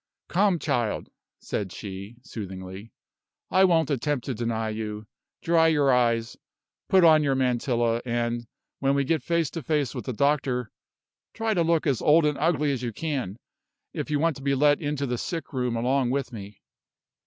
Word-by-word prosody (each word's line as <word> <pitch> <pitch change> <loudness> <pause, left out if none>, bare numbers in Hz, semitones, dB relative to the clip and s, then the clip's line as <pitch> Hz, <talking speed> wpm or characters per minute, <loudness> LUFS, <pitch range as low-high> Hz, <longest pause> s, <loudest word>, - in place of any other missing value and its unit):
"Come, 190 0 +3
child," 125 -9 -1 0.3
said 100 -3 -3
she, 100 +2 -8
soothingly; 95 0 -8 0.6
"I 190 +1 +5
won't 165 -4 +2
attempt 140 0 -1
to 135 - -2
deny 115 -1 -2
you. 110 -1 -5 0.4
Dry 165 -1 +4
your 145 -4 +3
eyes, 115 -2 +1 0.5
put 190 -2 +5
on 160 -2 +7
your 140 -2 +1
mantilla; 120 -2 +1
and, 120 -1 -2 0.3
when 135 0 +2
we 140 - +2
get 160 +3 0
face 170 -3 0
to 165 - -5
face 145 -3 0
with - - -6
the 130 - -3
doctor, 135 -2 0 0.6
try 225 -1 0
to 175 - +1
look 165 -1 +2
as 140 -6 +1
old 155 +1 +5
and 150 -2 0
ugly 150 -2 +2
as 130 -3 -2
you 120 -2 -3
can, 130 - -3 0.6
if - - -4
you 150 - +1
want 165 +1 +1
to - - -11
be 140 0 +1
let 145 +3 +3
into 145 -2 -2
the 125 -2 -2
sick 165 -6 -5
room 125 -2 -1
along 125 +2 +1
with 135 -1 -2
me." 100 -2 -10
135 Hz, 175 wpm, -26 LUFS, 115-155 Hz, 0.6 s, on